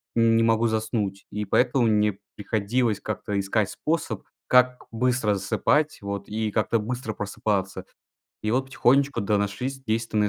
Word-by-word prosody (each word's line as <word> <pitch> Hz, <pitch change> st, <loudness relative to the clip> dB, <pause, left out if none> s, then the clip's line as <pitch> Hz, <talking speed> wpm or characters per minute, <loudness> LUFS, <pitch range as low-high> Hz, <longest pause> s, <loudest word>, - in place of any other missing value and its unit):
не 115 Hz, 0 st, +4 dB
могу 115 Hz, 0 st, +3 dB
заснуть, 110 Hz, -3 st, -2 dB
и 105 Hz, 0 st, -3 dB
поэтому 125 Hz, +4 st, +2 dB
мне 105 Hz, -2 st, +2 dB, 0.2 s
приходилось 110 Hz, +1 st, 0 dB
как-то 105 Hz, -1 st, -3 dB
искать 100 Hz, +1 st, 0 dB
способ, 165 Hz, +1 st, -2 dB, 0.2 s
как 125 Hz, 0 st, +4 dB
быстро 120 Hz, -2 st, +1 dB
засыпать 125 Hz, +10 st, +1 dB
вот 100 Hz, 0 st, -5 dB
и 110 Hz, 0 st, -2 dB
как-то 110 Hz, +2 st, +1 dB
быстро 115 Hz, +1 st, -4 dB
просыпаться. 100 Hz, -2 st, -2 dB, 0.6 s
И 110 Hz, -, -1 dB
вот 130 Hz, +3 st, +1 dB
потихонечку, 135 Hz, +1 st, +2 dB
да, 100 Hz, +1 st, +1 dB
нашлись 125 Hz, +7 st, -3 dB
действенные 110 Hz, -3 st, 0 dB
110 Hz, 140 wpm, -25 LUFS, 105-125 Hz, 0.6 s, не